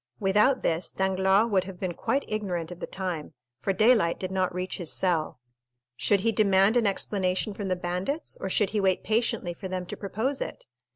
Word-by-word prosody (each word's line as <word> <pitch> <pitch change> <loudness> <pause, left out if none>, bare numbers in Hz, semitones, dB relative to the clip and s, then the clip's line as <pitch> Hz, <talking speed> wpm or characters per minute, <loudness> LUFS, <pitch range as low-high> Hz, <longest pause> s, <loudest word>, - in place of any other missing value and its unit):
Without 210 +6 +3
this, 165 +1 0
Danglars 190 +2 +2
would 190 -2 +2
have 190 -2 -9
been 185 -2 -2
quite 275 +10 -1
ignorant 180 -6 -3
of 175 - -8
the - - -5
time, 180 -5 -5 0.2
for 165 - 0
daylight 215 -3 +3
did 185 0 -4
not 185 -1 0
reach 180 +1 -4
his 175 -4 -2
cell. 165 -8 0 0.6
Should 200 +9 +2
he 230 +2 +2
demand 200 0 +4
an 235 -3 +3
explanation 195 0 0
from 200 0 -5
the 185 - +1
bandits, 180 - -2
or 190 - -4
should 200 +1 +1
he 210 -1 0
wait 190 -1 +1
patiently 220 -5 0
for 190 - -7
them 185 -1 -4
to - - -6
propose 220 +8 -2
it? - - -5
190 Hz, 195 wpm, -27 LUFS, 180-215 Hz, 0.6 s, demand